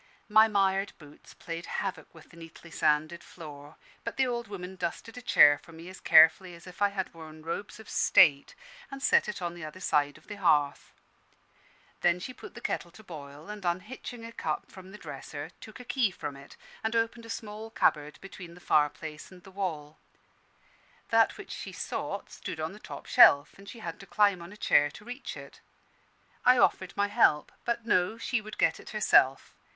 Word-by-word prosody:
My 215 +1 +7
mired 195 -1 +1
boots 150 -2 -16
played 165 0 -7
havoc - - -4
with 160 -1 -17
the - - -16
neatly 165 0 -13
sanded 155 +2 +1
floor; 150 -3 -11 0.3
but 230 - -5
the 265 - +3
old 240 -2 -3
woman 190 -2 -7
dusted 185 +5 -5
a 250 - -8
chair 145 -11 +6
for 165 - -16
me 165 +2 -10
as 185 - -11
carefully 165 +3 +6
as 170 - -15
if 180 +1 -13
I 205 - +4
had 195 -2 -4
worn 155 -1 -11
robes 200 +6 -5
of 220 - -13
state, 140 -5 +4 0.3
and 275 0 -7
set - - +4
it 200 -3 -5
on 170 -1 -2
the 175 -1 -9
other 155 +4 -8
side 145 -5 +1
of 155 - -21
the 205 - -8
hearth. 150 -7 +2 1.1
Then 175 0 +3
she 255 +8 -7
put - - -12
the - - -9
kettle 175 - -2
to 220 +6 -16
boil, 150 -3 -10
and 210 -1 -8
unhitching 215 +6 -4
a 230 - -8
cup 155 -8 -4
from 190 -1 -12
the 210 - -10
dresser, 145 -1 -8
took 215 +1 -11
a 250 - -10
key 250 -4 +1
from 145 -6 -6
it, 140 0 -14 0.3
and 220 +1 -1
opened 230 0 -1
a - - -14
small 220 0 -6
cupboard 150 -8 +1
between 185 -3 -10
the - - -14
fireplace 155 0 0
and 180 -1 -15
the 190 - -14
wall. 160 -6 -4 1.1
That - - +3
which - - -10
she - - -6
sought - - -5
stood - - -7
on - - -2
the - - -12
top - - -9
shelf 140 +1 +6
and 195 0 -13
she - - -10
had 165 -3 -6
to 195 - -12
climb 200 -4 +3
on 170 +2 -10
a 210 - -12
chair 145 -7 +4
to 210 +8 -14
reach 250 +3 -7
it. - - -12 0.8
I 250 0 +6
offered 190 -6 +2
my 200 0 +2
help: 150 -10 +3
but 235 -1 -1
no 185 0 +2
she 235 0 -1
would 215 0 -10
get - - +2
it - - -12
herself. 135 -10 +3
180 Hz, 200 wpm, -29 LUFS, 155-210 Hz, 1.1 s, My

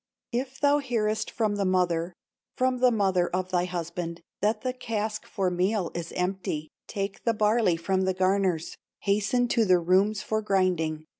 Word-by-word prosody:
"If 260 +2 -3
thou 290 0 +4
hearest 220 -5 -1
from 215 -3 -1
the 200 - +1
mother, 180 -2 +1 0.4
From 255 0 +1
the 250 0 +5
mother 190 -6 +2
of 185 +1 -2
thy 180 -1 +2
husband, 170 -1 -4 0.2
That 215 +2 +1
the 255 0 -2
cask 220 -3 -3
for 190 -3 -1
meal 185 +1 0
is 170 -1 -5
empty, 180 -4 -2 0.2
Take 195 -2 -4
the 230 -1 +1
barley 210 -4 +3
from 190 +3 0
the 190 -1 0
garners, 185 -3 +1 0.3
Hasten 210 +5 +1
to 230 - +3
the 185 -3 +5
rooms 190 +4 +2
for 220 0 -1
grinding. 180 -6 0
195 Hz, 165 wpm, -27 LUFS, 180-220 Hz, 0.4 s, the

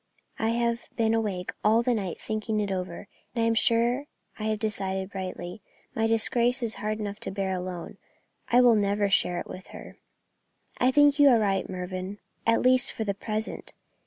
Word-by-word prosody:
I 220 - +1
have 235 0 -1
been 225 -1 +2
awake 205 -5 -1
all 220 +3 +4
the 250 0 +2
night 195 -6 -3
thinking 215 0 -2
it 205 -1 -1
over, 185 0 -4 0.3
and 230 - +1
I - - +3
am 230 - +3
sure 235 +4 +2 0.3
I 215 - -3
have 215 0 0
decided 195 -3 -2
rightly. 185 0 -6 0.3
My 225 0 +1
disgrace 240 +3 +2
is 225 -1 -1
hard 215 0 -1
enough 205 -1 -4
to - - -4
bear 195 -1 -2
alone; 180 -1 -5 0.5
I 245 +1 +6
will 245 -2 +6
never 205 -1 +1
share 175 -2 +2
it - - -5
with 185 - -9
her." - - -11 0.8
"I 250 - +4
think 290 +2 +4
you 285 -1 +8
are 245 - +6
right, 195 -3 0
Mervyn 185 +1 -5 0.3
at 230 - +3
least 255 +1 +4
for 220 - -3
the 200 -2 -1
present. 215 +2 -4
215 Hz, 190 wpm, -27 LUFS, 195-235 Hz, 0.8 s, you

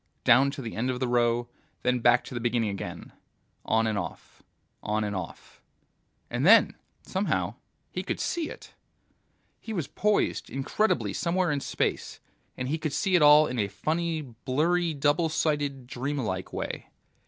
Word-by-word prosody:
down 135 +4 +6
to 140 -1 -6
the 115 - -6
end 120 +4 -1
of 125 -1 -2
the 130 - 0
row, 120 0 +2 0.4
then 125 0 +2
back 120 +1 +4
to - - -9
the 120 - -3
beginning 115 -2 0
again, 100 - -7 0.5
on 110 0 +2
and 110 -2 0
off, 85 -4 -8 0.4
on 105 +1 -1
and 105 -1 -3
off... 95 -3 -8 0.7
And - - -2
then, - - +7 0.3
somehow, 195 +2 -1 0.4
he - - -3
could - - -3
see 335 -3 -2
it! - - -11 0.9
He 225 - -7
was 170 -8 -1
poised 210 +1 0
incredibly 135 - 0
somewhere 175 - 0
in 145 - 0
space, - - -2 0.4
and 130 - -3
he 155 +4 -1
could 155 -2 -3
see 190 +6 0
it 175 - +5
all 150 +1 +8
in 125 -4 -3
a 100 - +1
funny, 160 - -2
blurry 150 +7 0
double 145 +4 +2
sighted, 145 -4 -1
dream 130 +4 -3
like 95 -8 -3
way. - - -5
135 Hz, 165 wpm, -27 LUFS, 120-160 Hz, 0.9 s, all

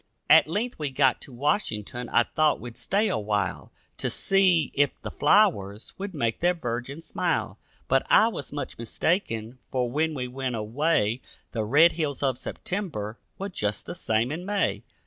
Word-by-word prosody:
At - - +8
length 215 +8 -2
we 150 -2 -1
got 135 0 +2
to - - -11
Washington; 125 - -2
I 120 - +4
thought 155 +5 +1
we'd 120 -1 -8
stay 205 +3 +1
a 110 - 0
while 105 -2 -2 0.3
To - - -1
see 190 -4 +3
if 145 -1 +1
the - - -5
flowers 145 - +2
would 195 -2 -5
make 115 -5 -1
their 175 +1 +2
virgin 125 0 -4
smile, - - -2 0.3
But - - +2
I - - +6
was - - -6
much - - -5
mistaken, 115 - -1
for 125 -2 -1
when 155 +3 0
we 125 -2 -3
went 130 -1 -3
away 115 +1 0 0.3
The 110 - -2
red 150 +9 +6
hills 150 -4 -3
of 130 -2 +1
September 130 - -4 0.2
were 195 +1 -4
just 105 - -2
the - - -5
same 110 +4 0
in 165 +4 -4
May. 200 +1 0
135 Hz, 170 wpm, -26 LUFS, 115-165 Hz, 0.3 s, At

